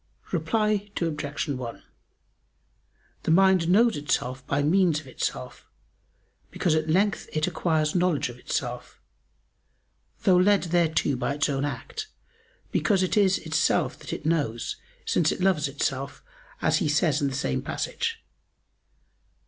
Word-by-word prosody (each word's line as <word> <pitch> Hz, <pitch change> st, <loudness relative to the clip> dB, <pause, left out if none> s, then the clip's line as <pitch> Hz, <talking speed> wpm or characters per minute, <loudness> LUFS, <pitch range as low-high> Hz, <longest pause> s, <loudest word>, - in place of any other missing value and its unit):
Reply 205 Hz, +4 st, 0 dB
Obj. 150 Hz, -3 st, -2 dB
1: 125 Hz, -5 st, -5 dB, 1.4 s
The -, -, -4 dB
mind 185 Hz, 0 st, +4 dB
knows 225 Hz, +4 st, +4 dB
itself 130 Hz, -3 st, -2 dB
by 140 Hz, 0 st, +1 dB
means 170 Hz, 0 st, +3 dB
of 155 Hz, -, -13 dB
itself, 65 Hz, -, -5 dB, 0.8 s
because 170 Hz, -, 0 dB
at 155 Hz, 0 st, 0 dB
length 195 Hz, +3 st, +1 dB
it 155 Hz, 0 st, +1 dB
acquires 160 Hz, -3 st, 0 dB
knowledge 180 Hz, -6 st, +1 dB
of 120 Hz, 0 st, -10 dB
itself, -, -, -4 dB, 1.2 s
though 185 Hz, -2 st, +5 dB
led 200 Hz, +2 st, +4 dB
thereto 165 Hz, -5 st, +2 dB
by 140 Hz, +2 st, -2 dB
its 145 Hz, +1 st, +1 dB
own 140 Hz, 0 st, 0 dB
act: 435 Hz, -, -5 dB, 0.6 s
because 195 Hz, -4 st, +2 dB
it 185 Hz, -, 0 dB
is 195 Hz, -2 st, +4 dB
itself 160 Hz, -1 st, 0 dB
that -, -, -8 dB
it -, -, -5 dB
knows, 145 Hz, -8 st, -1 dB, 0.3 s
since 160 Hz, -3 st, +2 dB
it -, -, -4 dB
loves 180 Hz, -6 st, +2 dB
itself, 140 Hz, 0 st, -3 dB, 0.4 s
as -, -, +3 dB
he -, -, 0 dB
says 150 Hz, -1 st, +2 dB
in 140 Hz, -, +2 dB
the 135 Hz, -, -3 dB
same 140 Hz, -, -1 dB
passage. 460 Hz, -1 st, -3 dB
160 Hz, 135 wpm, -26 LUFS, 145-185 Hz, 1.4 s, though